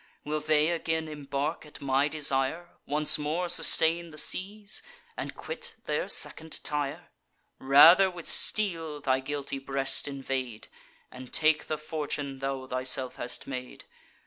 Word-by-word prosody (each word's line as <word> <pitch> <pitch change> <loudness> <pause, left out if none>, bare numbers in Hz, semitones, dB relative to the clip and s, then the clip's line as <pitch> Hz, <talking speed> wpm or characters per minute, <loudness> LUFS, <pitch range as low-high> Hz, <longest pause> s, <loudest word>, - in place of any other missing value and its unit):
Will 155 +1 -1
they 155 +1 +2
again 160 -1 -1
embark 145 +1 -3
at 150 - -12
my 140 +1 +2
desire, 150 +3 0 0.2
Once 150 +1 +3
more 160 +4 -1
sustain 170 -1 +2
the 155 - -12
seas, 200 +6 0 0.3
and - - -5
quit 475 -1 -6
their - - -1
second 160 0 -1
Tyre? 145 -2 -3 0.5
Rather 165 +8 +8
with 175 -2 -9
steel 165 -8 0
thy 130 -2 +1
guilty 140 0 -4
breast 135 0 -1
invade, 135 -4 -4 0.4
And 125 0 -10
take 155 -1 +2
the 155 - -2
fortune 145 -3 -4
thou 135 -1 -3
thyself 130 0 -1
hast 120 0 -3
made. 125 -2 -7
150 Hz, 135 wpm, -28 LUFS, 135-160 Hz, 0.5 s, Rather